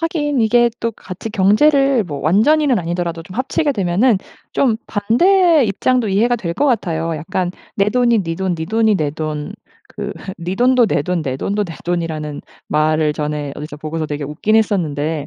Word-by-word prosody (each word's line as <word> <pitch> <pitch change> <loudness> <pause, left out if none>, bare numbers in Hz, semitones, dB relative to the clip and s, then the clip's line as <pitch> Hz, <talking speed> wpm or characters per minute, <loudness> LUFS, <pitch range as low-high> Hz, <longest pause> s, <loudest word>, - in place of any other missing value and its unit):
하긴 295 -5 -1
이게 240 +2 +4
또 230 0 -1
같이 195 +3 -8
경제를 265 +5 +3
뭐 145 -5 -6
완전히는 250 - +3
아니더라도 170 -1 -3
좀 185 - -12
합치게 275 +3 0
되면은 200 +2 +2 0.3
좀 240 -5 +2
반대 325 - +3
입장도 240 +3 +1
이해가 230 +5 +2
될 170 -5 -4
것 290 - +1
같아요. 165 - -1
약간 175 +3 -2 0.3
"내 200 +1 +2
돈이 235 -3 +3
니 165 -1 -4
돈, 190 -2 -1
니 160 - -4
돈이 220 0 +2
내 150 -3 -1
돈." 155 -1 -4 0.4
그 - - -6 0.3
"니 175 +2 -3
돈도 250 -1 +4
내 145 - 0
돈, 175 +1 -1
내 130 -2 -3
돈도 205 +7 -1
내 165 -4 -8
돈."이라는 160 -4 -3 0.3
말을 155 0 +2
전에 150 -1 -3
어디서 150 0 -7
보고서 155 +1 -4
되게 145 0 -4
웃긴 160 +9 -1
했었는데 160 -8 0
190 Hz, 335 characters per minute, -18 LUFS, 160-240 Hz, 0.4 s, 이게